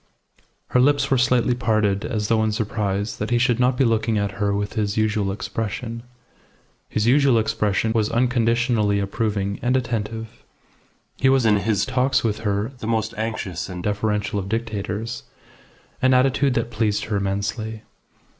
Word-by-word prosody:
Her 125 - +3
lips 145 +3 +3
were 135 - +4
slightly 125 0 +3
parted 110 -5 +1
as 105 -2 -2
though 110 -1 +2
in 110 - +1
surprise 105 -2 -2
that 105 - -3
he 120 - +2
should 120 -1 +2
not 125 0 +2
be 135 - +3
looking 115 -1 +1
at 100 -1 0
her 100 -1 +2
with 100 +1 -2
his 105 -2 -1
usual 105 -2 +1
expression. 115 +2 -4 0.9
His 110 - 0
usual 135 0 +4
expression 105 -1 0
was 110 -2 +1
unconditionally 115 -3 +2
approving 100 -1 -2
and 125 +1 +2
attentive. 115 -2 -4 0.7
He 130 - +3
was 135 -2 +3
in 105 -2 +5
his 100 0 0
talks 130 +1 +1
with 110 -2 0
her 105 +1 -1
the 110 - -5
most 110 -1 0
anxious 105 -5 -4
and 90 -1 -6
deferential 105 0 -1
of 95 0 -5
dictators, 110 0 -3 0.8
an 130 0 +4
attitude 135 +1 +2
that 115 0 -1
pleased 110 -2 0
her 105 -2 -1
immensely. 100 +3 -3
110 Hz, 160 wpm, -22 LUFS, 105-120 Hz, 0.9 s, in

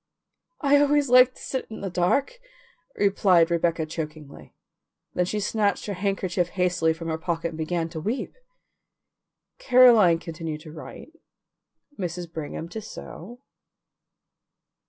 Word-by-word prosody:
"I 285 -1 +4
always 290 -1 +3
like 255 0 +6
to - - -15
sit 260 - -4
in 220 - -8
the 195 -2 -4
dark," 270 - 0 0.6
replied 185 -4 +3
Rebecca 170 -1 +1
chokingly. 150 - -8 0.6
Then 180 - +1
she 210 +4 -2
snatched 210 0 0
her 205 - -3
handkerchief 185 -2 -1
hastily 180 -3 +1
from 165 +1 -6
her 160 0 -2
pocket 170 -1 -2
and 160 - -9
began 165 +1 -1
to 160 -1 -6
weep. 220 - -3 1.3
Caroline 235 -9 +6
continued 165 -2 -6
to 155 -1 -11
write, 160 - -10 0.9
Mrs. 175 -2 -5
Brigham 160 +1 -5
to 220 +5 -6
sew. 220 +2 -10
180 Hz, 130 wpm, -25 LUFS, 165-215 Hz, 1.3 s, like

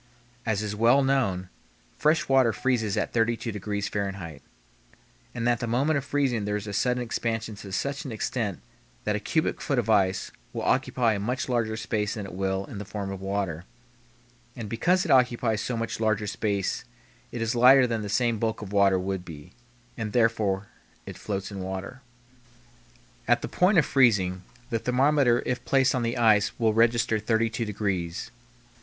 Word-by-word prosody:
As 110 -1 0
is 105 -1 -3
well 120 +6 +4
known, 105 -10 0 0.5
fresh 155 +3 +2
water 130 -3 +4
freezes 120 -5 0
at - - -1
32 115 0 0
degrees 105 0 -3
Fahrenheit, 95 -7 -4 0.9
and 120 -1 -1
at 120 -2 +2
the 120 - -3
moment 135 +7 +1
of - - -8
freezing 135 -6 0
there 105 0 -1
is 105 0 -4
a 105 - -6
sudden 125 +4 +1
expansion 115 -1 -2
to 100 -1 -9
such 140 +9 -2
an 135 - -6
extent 110 - -3 0.4
that 105 - 0
a - - -1
cubic 160 +8 -1
foot 140 - -1
of 115 -2 +1
ice 95 -3 +2 0.2
will - - -4
occupy 115 -3 +2
a 100 - -2
much 125 +6 -2
larger 115 -3 0
space 105 -1 -2
than 105 -3 -5
it 95 - -9
will 95 +1 -1
in 100 - -8
the - - -4
form 100 -1 -5
of 95 -1 -7
water; 95 -4 -2 0.9
and 115 -3 -6
because 175 - +1
it - - 0
occupies 120 -4 +3
so 125 - -2
much 115 -1 -3
larger 110 -1 +1
space 100 -1 -2 0.5
it 120 - -5
is 115 +1 0
lighter 125 +2 +7
than 115 -2 -2
the 105 - -5
same 115 +1 +1
bulk 110 -1 -2
of 100 0 -8
water 100 -2 +4
would 95 0 -3
be, 75 -4 -11 0.5
and 105 -2 -3
therefore 110 -4 +1 0.4
it - - -8
floats 100 -1 -4
in 100 - -6
water. 95 +7 -6 1.3
At - - +3
the - - -2
point 180 +2 +3
of 160 - +5
freezing, 100 -9 +3 0.3
the 115 - +1
thermometer 125 0 +3
if 125 - -2
placed 135 -1 +3
on 130 - 0
the 115 0 -1
ice 110 -3 +3
will 110 -2 +2
register 115 0 +2
32 115 +2 0
degrees. 95 -5 -3
110 Hz, 180 wpm, -26 LUFS, 100-125 Hz, 1.3 s, lighter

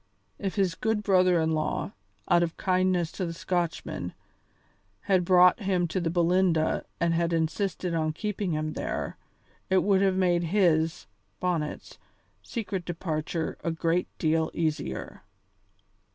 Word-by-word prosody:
If 195 -2 -3
his 190 -4 +1
good 220 +3 -1
brother 185 -3 +4
in 160 0 +1
law, 155 -1 -1 0.4
out 175 0 +4
of 170 -1 -1
kindness 185 -2 +1
to 185 - -3
the 165 - -4
Scotchman, 175 -1 -3 0.9
had 190 -3 +2
brought 180 +2 +6
him 190 -4 +1
to 185 - -1
the 170 - 0
Belinda 175 -1 +2
and 170 0 +2
had 170 0 +1
insisted 170 +2 -1
on 155 -1 0
keeping 200 +1 -3
him 155 0 -2
there, - - -4 0.5
it 190 0 +3
would 195 -1 +3
have 190 -1 +3
made 175 -2 +2
his, 165 -3 +2 0.3
Bonnet's, 170 -5 -3 0.4
secret 200 -6 -4
departure 165 -1 -3
a - - 0
great 165 +2 0
deal 160 0 +1
easier. 150 - -3
175 Hz, 135 wpm, -27 LUFS, 165-185 Hz, 0.9 s, brought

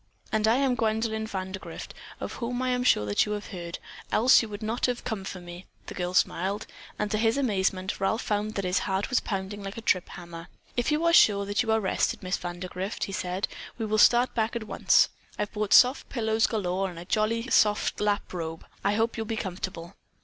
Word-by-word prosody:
"And 215 0 +2
I 225 - +5
am 270 -1 +2
Gwendolyn 220 -1 0
Vandergrift, 190 -2 -6 0.3
of - - -5
whom 245 +1 -2
I 255 - 0
am 250 0 +1
sure 105 - +4
that 100 - +2
you 210 - -1
have 210 0 -5
heard, 175 -3 -6 0.3
else 245 +4 +6
you 225 - -5
would 205 +1 -7
not 225 +4 0
have 245 -1 -2
come 210 -4 -3
for 190 -1 -6
me," 175 +1 -10 0.2
the - - -7
girl 180 0 -3
smiled; 195 +4 +1 0.3
and, 210 0 -2
to 215 - +1
his 225 +3 +2
amazement, 190 -7 0
Ralph 220 +4 0
found 210 +1 -1
that 200 - -2
his 180 +1 +2
heart 190 +6 -1
was 250 - +4
pounding 195 0 -4
like 195 +2 -7
a - - -5
trip 185 -5 +1
hammer. 170 -1 -9 0.3
"If 245 +4 0
you 305 +3 +1
are 335 - +4
sure 200 -10 +6
that 205 +1 0
you 225 -2 0
are 220 - +3
rested, 195 -1 0
Miss 185 0 -1
Vandergrift," 180 +3 -5
he - - -3
said, 185 0 -2 0.3
"we 225 - -2
will 215 0 +1
start 240 +3 +5
back 225 0 0
at 235 - -2
once. 215 - +3 0.3
I've 205 - -2
brought 210 -2 -2
soft 255 +2 +6
pillows 220 -3 +1
galore, 195 -3 -1
and 175 - -10
a 170 - -8
jolly 225 +4 0
soft 210 0 +3
lap 205 -2 0
robe. 165 -2 -5 0.2
I 200 - +2
do - - -1
hope 225 +1 0
you'll 225 -1 -3
be 225 - -2
comfortable." 185 -3 -5
210 Hz, 220 wpm, -27 LUFS, 185-225 Hz, 0.3 s, else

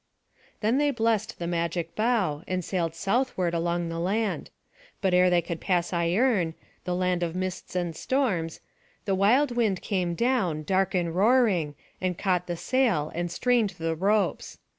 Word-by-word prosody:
Then 225 +5 +2
they 295 0 +3
blest 225 -3 0
the 170 - -4
magic 170 -1 -2
bough, 215 -10 +1
and 185 -2 -2
sailed 170 -4 -1
southward 195 -2 0
along 170 0 0
the 165 0 -4
land. 205 +5 -1 0.5
But 190 -3 +1
ere 180 0 +5
they 175 -1 +3
could 170 0 -5
pass 175 -2 0
Ierne, 175 0 +1 0.3
the 180 - -1
land 180 -1 0
of 170 -1 -2
mists 185 0 -4
and 175 -3 -1
storms, 185 - -1 0.4
the 195 - +1
wild 240 +9 +3
wind 215 -6 +1
came 180 -4 -1
down, 195 -10 0
dark 190 +3 +1
and 170 -2 0
roaring, 195 - +3 0.3
and 185 -2 -1
caught 180 -2 0
the 175 -1 -3
sail, 230 - +1
and 175 +1 -2
strained 235 +2 +1
the 165 0 -1
ropes. 200 +5 0
185 Hz, 160 wpm, -27 LUFS, 170-215 Hz, 0.5 s, ere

